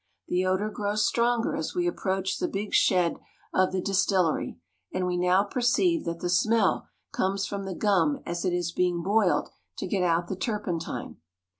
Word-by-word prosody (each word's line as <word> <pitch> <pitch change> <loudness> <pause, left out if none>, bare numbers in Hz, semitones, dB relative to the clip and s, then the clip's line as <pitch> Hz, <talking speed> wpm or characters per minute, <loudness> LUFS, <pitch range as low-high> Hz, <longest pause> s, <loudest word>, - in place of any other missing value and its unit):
The 180 +1 +1
odor 195 +3 0
grows 210 +1 0
stronger 235 0 +1
as - - -4
we 355 -1 +1
approach 190 - -1
the 360 - 0
big 210 - -4
shed 180 -3 +3 0.4
of 185 0 +3
the 185 0 -1
distillery, 190 - +1 0.3
and 185 0 -1
we 180 0 -1
now 180 +2 +3
perceive 250 - +1
that 170 0 -4
the - - -1
smell 215 +3 +2 0.2
comes 195 +1 0
from 200 -1 -4
the 190 -2 -4
gum 175 -9 +2
as 170 0 -3
it 185 - +1
is 175 -1 -1
being 175 -1 0
boiled 200 0 +2 0.3
to - - -3
get 190 0 -1
out 170 -1 +1
the 190 - -3
turpentine. 195 -5 -3
190 Hz, 175 wpm, -27 LUFS, 180-210 Hz, 0.4 s, shed